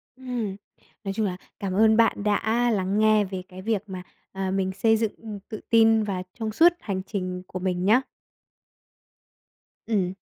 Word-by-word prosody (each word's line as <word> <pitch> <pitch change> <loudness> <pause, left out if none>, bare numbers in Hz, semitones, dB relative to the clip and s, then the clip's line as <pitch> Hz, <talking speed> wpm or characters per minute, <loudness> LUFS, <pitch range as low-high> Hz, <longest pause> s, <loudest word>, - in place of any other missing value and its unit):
Ừm, 245 -6 -4 0.5
nói 195 -1 -3
chung 215 +2 0
là 180 -2 -2 0.2
cảm 195 -2 -3
ơn 220 +2 +4
bạn 225 -3 +3
đã 225 +3 +1
lắng 195 +1 0
nghe 215 -1 +4
về 190 -1 -5
cái 185 0 -10
việc 210 -1 -1
mà, 185 -1 -7 0.3
à, 190 -1 -3
mình 190 -1 0
xây 220 +3 +2
dựng, 220 -2 0
ừm, 215 -3 -8
tự 215 - -6
tin 225 -1 +5
và 190 -3 -3 0.2
trong 220 -1 -2
suốt 335 +10 +5
hành 195 -3 -3
trình 185 -3 -4
của 185 - -6
mình 180 0 -1
nhá. 225 +6 +5 1.8
Ừm. 190 -5 0
205 Hz, 175 wpm, -25 LUFS, 190-225 Hz, 1.8 s, tin